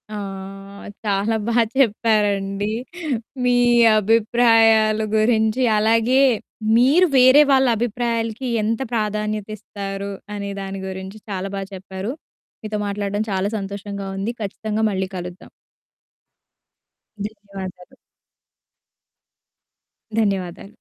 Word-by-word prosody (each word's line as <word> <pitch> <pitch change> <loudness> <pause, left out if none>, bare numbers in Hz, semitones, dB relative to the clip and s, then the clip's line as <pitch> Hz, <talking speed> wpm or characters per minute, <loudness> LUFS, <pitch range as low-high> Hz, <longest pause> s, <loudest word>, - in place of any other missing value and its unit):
ఆ! - - -4 0.9
చాలా 205 +2 +1
బా 235 0 +1 0.2
చెప్పారండి. 205 -4 +1 0.7
మీ 245 0 +3 0.4
అభిప్రాయాల 225 0 +4 0.2
గురించి, 220 +2 +2 0.2
అలాగే 230 +4 +3 0.6
మీరు 290 +10 +5
వేరే 260 +3 +7
వాళ్ళ 265 -1 +4
అభిప్రాయాలకి 235 +1 -2 0.2
ఎంత 225 +3 -1
ప్రాధాన్యత 215 -1 -1
ఇస్తారు 200 0 -6 0.2
అనే 200 -1 -4
దాని 195 0 -6
గురించి, 190 +2 -7
చాలా 195 -1 -3
బా 195 - -3
చెప్పారు. 190 +3 -6 0.5
మీతో 215 0 -3
మాట్లాడడం 200 0 -2
చాలా 190 +1 0
సంతోషంగా 200 0 -6
ఉంది. 200 +4 -2
ఖచ్చితంగా 215 +1 -3
మళ్ళీ 190 -1 -2
కలుద్దాం. 180 0 -8 1.8
ధన్యవాదాలు. 195 -4 -9 2.2
ధన్యవాదాలు. 195 -1 -2
210 Hz, 90 wpm, -21 LUFS, 195-225 Hz, 2.2 s, వేరే